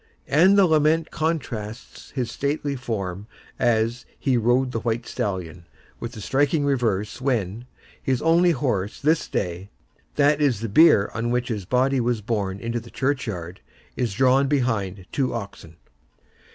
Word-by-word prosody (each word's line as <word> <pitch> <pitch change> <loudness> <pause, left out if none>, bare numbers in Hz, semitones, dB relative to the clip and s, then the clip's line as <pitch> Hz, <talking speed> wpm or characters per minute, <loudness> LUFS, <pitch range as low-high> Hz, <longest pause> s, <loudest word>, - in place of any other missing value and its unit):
And 185 +7 +5
the 200 - +7
lament 160 0 +2
contrasts 125 -9 -4
his 125 -4 -3
stately 145 0 -2
form 105 -6 -4 0.3
as 120 0 +1
"he 135 -3 +1
rode 120 +3 +2
the 115 - -2
white 115 +1 -2
stallion," 90 -4 -4 0.3
with 120 +1 -6
the 110 - -8
striking 145 +6 +1
reverse 115 -6 0
when, 120 -3 -1 0.3
"his 130 -2 0
only 170 +4 +4
horse 120 - -1
this 155 +2 +1
day"—that 100 - -2
is 130 -8 +2
the 115 - -3
bier 130 -3 +5
on 115 +2 -2
which 125 +1 -1
his 105 -5 -3
body 130 +4 +2
was 120 -2 0
borne 100 -3 -2
to 120 - -1
the 115 +1 -13
churchyard—"is 115 -3 -4
drawn 130 +3 +4
behind 110 -9 -1
two 130 -3 -1
oxen." 100 -7 -8
120 Hz, 140 wpm, -24 LUFS, 105-140 Hz, 0.3 s, the